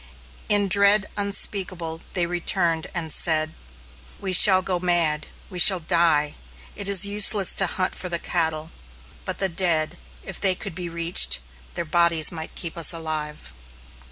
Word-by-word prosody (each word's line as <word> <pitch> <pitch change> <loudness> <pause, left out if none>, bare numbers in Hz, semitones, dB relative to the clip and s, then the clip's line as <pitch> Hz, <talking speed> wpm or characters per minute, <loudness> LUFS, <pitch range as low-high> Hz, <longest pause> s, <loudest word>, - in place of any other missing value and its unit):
In 205 -1 +1
dread 200 +1 +4
unspeakable 185 -5 -3
they 175 -2 -1
returned, 170 -1 -1
and 160 -3 -5
said: 155 -2 0 0.7
"We 190 -2 -5
shall 185 0 +7
go 180 -1 -3
mad; 170 -4 0 0.2
we 180 -3 -9
shall 185 +1 +7
die! 160 -3 0 0.4
It 200 - -5
is 200 0 +2
useless 205 -1 +4
to 190 - +1
hunt 185 +1 -4
for 180 - -6
the 170 - -1
cattle; 160 -2 -3 0.5
but - - -6
the 195 - -2
dead, 170 -3 -2 0.2
if 190 - -9
they 190 -2 +2
could - - -8
be 175 0 -8
reached, 170 +1 +3 0.4
their 170 - -5
bodies 170 -1 +1
might 160 -2 -9
keep 170 -1 -6
us 165 - +5
alive." 155 - -6
175 Hz, 155 wpm, -21 LUFS, 160-190 Hz, 0.7 s, shall